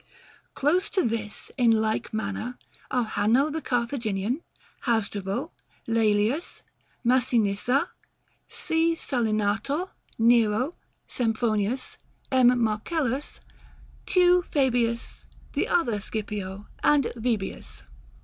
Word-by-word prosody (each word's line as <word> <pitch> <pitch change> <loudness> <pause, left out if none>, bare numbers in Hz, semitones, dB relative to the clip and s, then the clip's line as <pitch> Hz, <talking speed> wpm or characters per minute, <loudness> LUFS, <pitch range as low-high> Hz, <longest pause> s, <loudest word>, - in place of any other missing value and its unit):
Close 340 +8 +2
to 380 - +1
this, 220 -2 -3
in 240 -2 +5
like 220 -1 +1
manner, 220 +3 -3 0.3
are 250 -2 +1
Hanno 225 +8 +2
the 320 +1 -3
Carthaginian, 235 - -1 0.5
Hasdrubal, 220 - -1 0.4
Laelius, 225 - +1 0.4
Massinissa, 245 0 +2 0.6
C. 325 +1 0
Salinator, 230 - -1 0.3
Nero, 230 +3 +3 0.3
Sempronius, 225 0 -1 0.3
M. 250 -1 +5
Marcellus, 260 +5 -1 0.7
Q. 360 -1 +5
Fabius, 245 -4 0 0.3
the - - 0
other 235 -12 +1
Scipio, 205 -2 -5 0.2
and 290 -4 +3
Vibius. 225 -4 -3
235 Hz, 85 wpm, -26 LUFS, 215-270 Hz, 0.7 s, in